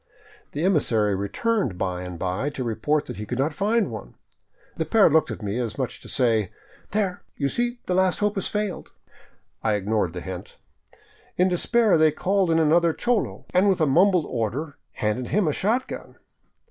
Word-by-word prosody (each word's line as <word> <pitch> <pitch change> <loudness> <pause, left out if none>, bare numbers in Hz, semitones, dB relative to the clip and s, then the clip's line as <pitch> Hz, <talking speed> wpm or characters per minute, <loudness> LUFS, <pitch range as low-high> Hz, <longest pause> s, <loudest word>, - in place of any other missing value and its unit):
The 150 - -2
emissary 115 - +2
returned 115 - -1
by 90 -1 -2
and 90 -1 -6
by 95 - -2
to 130 - -1
report 125 +6 0
that - - -7
he 105 - -5
could 125 - -3
not 145 +4 0
find 210 - +1
one. 105 - -8 0.6
The 160 - -1
pair 200 +1 +5
looked 160 +1 +3
at - - -6
me 105 +4 -2
as 115 -4 -3
much 130 -3 -3
as - - -21
to - - -10
say, 115 -7 +2 0.4
"There, 195 -3 -1 0.2
you 140 - 0
see 240 - -1
the 180 - -1
last 185 0 +2
hope 210 0 +1
has 195 - -2
failed." 210 -3 -3 0.7
I 110 - +1
ignored 105 -3 0
the 90 - -5
hint. 95 -1 -8 0.8
In 180 +1 +4
despair 210 +1 +3
they 155 0 +5
called 190 +3 +1
in 165 - +3
another 165 +1 +4
cholo 240 +2 -1
and 185 +3 +4
with 190 - +2
a 155 - +4
mumbled 175 +3 +4
order 130 +6 -3 0.2
handed 115 +2 -2
him 200 -4 +1
a 150 - +1
shotgun. 230 - -2
155 Hz, 185 wpm, -24 LUFS, -, 0.8 s, pair